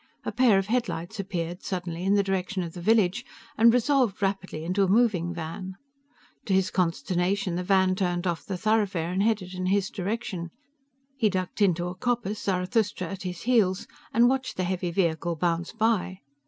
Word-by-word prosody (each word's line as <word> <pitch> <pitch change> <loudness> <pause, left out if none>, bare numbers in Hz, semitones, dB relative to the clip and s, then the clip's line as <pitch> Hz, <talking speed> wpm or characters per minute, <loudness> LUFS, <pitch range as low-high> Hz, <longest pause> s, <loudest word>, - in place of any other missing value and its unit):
A - - -1
pair 240 -6 +4
of 195 - +1
headlights 215 -6 -2
appeared 175 -2 -3
suddenly 175 -2 -4
in 195 +2 +3
the 200 - +3
direction 190 -1 -1
of 165 -1 -6
the 175 - -8
village 215 +2 +3 0.3
and 230 +1 +6
resolved 250 -3 +2
rapidly 195 -5 -2
into 185 +4 0
a - - +2
moving 195 -5 +2
van. 175 +3 -6 0.7
To 195 - +1
his 190 -1 +2
consternation, 180 +2 0
the 180 - -1
van 190 0 +3
turned 175 -2 -1
off 170 -2 -1
the 190 - -4
thoroughfare 200 -5 +1
and 185 +2 0
headed 205 -4 0
in 185 0 -3
his 195 +1 +1
direction. 195 -3 -3 0.7
He 225 -5 +3
ducked 185 +1 -3
into 175 -3 +3
a 180 - -3
coppice, 215 0 -2
Zarathustra 190 0 0
at 195 -1 -6
his 180 -2 -5
heels, 215 -6 +2 0.3
and 235 +2 +5
watched 265 +1 -1
the 185 - 0
heavy 180 -1 -1
vehicle 170 -1 0
bounce 170 +1 -1
by. 220 -4 0
190 Hz, 180 wpm, -26 LUFS, 180-210 Hz, 0.7 s, and